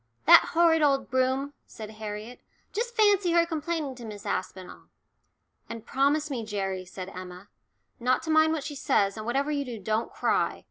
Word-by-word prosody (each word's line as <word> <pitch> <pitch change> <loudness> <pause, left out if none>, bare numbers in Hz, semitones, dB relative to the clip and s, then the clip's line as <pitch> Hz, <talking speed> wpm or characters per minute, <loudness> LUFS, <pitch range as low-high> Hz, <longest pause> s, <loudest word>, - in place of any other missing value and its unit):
"That - - +8
horrid 330 -1 +4
old 275 -3 +2
Broom," 260 +2 0
said 215 -1 -9
Harriet, 215 +2 -7 0.3
"just 475 +3 -3
fancy 405 -5 +3
her 340 0 +4
complaining 320 -3 -3
to 240 - -10
Miss 210 -2 -9
Aspinall." 185 0 -5 0.8
And 230 -1 -7
"Promise 285 +4 +1
me, 240 -4 -3
Gerry," 195 -3 -3
said 185 +1 -8
Emma, 185 +1 -10 0.5
"not 250 +1 +1
to 320 - -2
mind 315 0 +5
what 310 -3 -3
she 295 - -5
says, 200 -7 +1
and 215 0 -7
whatever 275 +5 0
you 285 -1 -1
do, 245 -4 -7
don't 215 +3 -2
cry. - - 0
255 Hz, 175 wpm, -27 LUFS, 210-310 Hz, 0.8 s, That